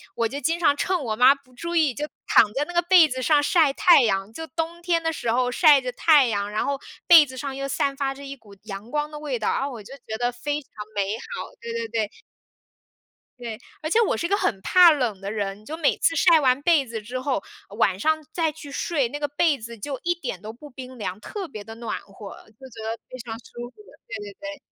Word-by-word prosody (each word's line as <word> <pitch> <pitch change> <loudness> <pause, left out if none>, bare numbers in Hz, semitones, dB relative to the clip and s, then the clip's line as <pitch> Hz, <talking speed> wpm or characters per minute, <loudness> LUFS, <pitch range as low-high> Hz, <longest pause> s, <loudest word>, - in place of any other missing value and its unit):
我 230 -1 +1
就 265 +5 -6
经 330 +1 0
常 290 -4 +3
趁 360 +3 -1
我 225 -5 -2
妈 250 +4 +7
不 275 -2 -21
注 335 +7 -6
意 305 -5 +3
就 295 +4 -3 0.2
躺 210 - +5
在 280 +4 -1
那 350 - -9
个 345 - +3
被 345 -2 +6
子 260 -2 -4
上 295 +3 +4
晒 305 0 +3
太 345 +2 +6
阳， 195 -2 0
就 320 - -6
冬 330 +1 -4
天 340 -1 +1
的 325 0 -1
时 235 -6 -2
候 250 +1 +1
晒 290 +2 +6
着 255 -1 -4
太 290 0 +5
阳， 205 -2 -2
然 215 - -1
后 280 0 -1 0.3
被 330 -3 +9
子 260 -2 -11
上 270 +1 -4
又 275 0 -4
散 275 0 -1
发 270 -1 -1
着 280 +1 -11
一 275 0 -7
股 215 -6 -18
阳 210 +2 -8
光 295 0 -1
的 300 - -8
味 285 -5 -3
道， 215 - -2
然 - - -1
后 280 - -3
我 235 -4 -8
就 225 +6 -12
觉 220 - -4
得 245 0 +1
非 290 +4 -3
常 270 - -26 0.2
美 200 0 -1
好， 230 - -7
对 235 0 -6
对 230 0 -3
对。 220 -2 -2 1.3
对， 230 -3 -6 0.2
而 310 - -3
且 440 - +3
我 440 - +2
是 340 - -2
个 400 - +2
很 195 - -1
怕 360 - +7
冷 245 -10 -1
的 200 +1 -4
人， 205 -1 -4
就 310 - -5
每 310 -4 +2
次 330 - +2
晒 335 -2 +5
完 260 -1 +2
被 310 -3 +3
子 225 -2 -6
之 245 +5 -5
后， 260 -5 -1 0.4
晚 190 -4 +2
上 315 +6 +1
再 325 -2 0
去 295 -2 -11
睡， 280 -2 0
那 290 - -6
个 295 - -1
被 290 +1 +1
子 230 0 -9
就 270 +5 -5
一 345 - +2
点 270 - -6
都 215 - -7
不 295 +6 -13
冰 255 -1 -10
凉， 195 -2 -4
特 390 - -6
别 215 -9 -9
地 225 - -10
暖 230 -1 -4
和， 200 0 -11 0.2
就 265 - -11
觉 225 -2 -10
得 225 +1 -3
非 255 - -8
常 230 -1 -6
舒 240 0 -9
服。 - - -30 0.3
对 - - -6
对 410 0 -8
对。 295 -1 -7
270 Hz, 270 characters per minute, -24 LUFS, 230-310 Hz, 1.3 s, 被